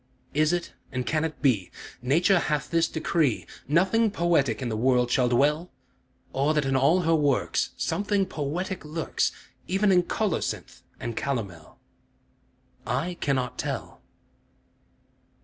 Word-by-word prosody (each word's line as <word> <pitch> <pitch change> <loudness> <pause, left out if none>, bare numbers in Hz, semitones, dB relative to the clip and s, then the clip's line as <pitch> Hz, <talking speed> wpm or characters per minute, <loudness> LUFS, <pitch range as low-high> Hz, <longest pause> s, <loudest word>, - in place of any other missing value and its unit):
Is 155 +2 +3
it, 175 -1 -2 0.2
and 125 -1 -2
can 155 +3 0
it 160 -1 -4
be, 110 -10 +2 0.3
Nature 170 +9 +3
hath 150 -4 -1
this 165 -1 +3
decree, 160 -6 0 0.2
Nothing 190 +9 +3
poetic 165 - +1
in 130 - -3
the 110 - -2
world 125 +1 +2
shall 125 -1 +3
dwell? 150 +8 +2 0.6
Or 145 +3 +1
that 150 -2 +2
in 135 0 +1
all 140 +8 +4
her 165 -1 +2
works 145 -4 +1
Something 200 -1 0
poetic 175 +3 -3
lurks, 155 +2 -1 0.4
Even 195 +2 +2
in 180 -1 +5
colocynth 195 0 -2 0.2
and 115 -1 -4
calomel? 100 - -4 1.1
I 135 +9 -1
cannot 130 -4 -1
tell. - - -4
150 Hz, 130 wpm, -26 LUFS, 130-175 Hz, 1.1 s, in